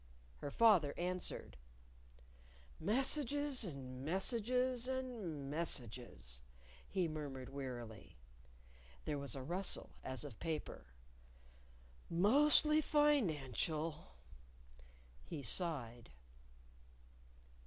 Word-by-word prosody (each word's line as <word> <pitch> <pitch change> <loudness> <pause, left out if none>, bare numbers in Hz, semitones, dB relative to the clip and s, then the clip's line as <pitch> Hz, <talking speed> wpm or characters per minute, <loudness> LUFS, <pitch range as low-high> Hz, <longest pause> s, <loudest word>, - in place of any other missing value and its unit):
Her 145 - -5
father 175 -5 +4
answered. 180 - -3 1.2
"Messages 280 +2 +1
and 130 -7 -6
messages 240 - +1
and 230 - -4
messages," 120 - -2 0.5
he 185 -3 0
murmured 145 -5 -6
wearily. 120 - -7 0.9
(There 150 -2 -2
was 140 -3 -3
a 135 - -5
rustle, 180 +7 -1
as 130 +2 -3
of 140 -7 -9
paper.) 160 - -4 1.2
"Mostly 295 - +5
financial," 160 - 0 1.1
He 100 - -6
sighed. 120 -5 +3
160 Hz, 75 wpm, -38 LUFS, -, 1.2 s, Mostly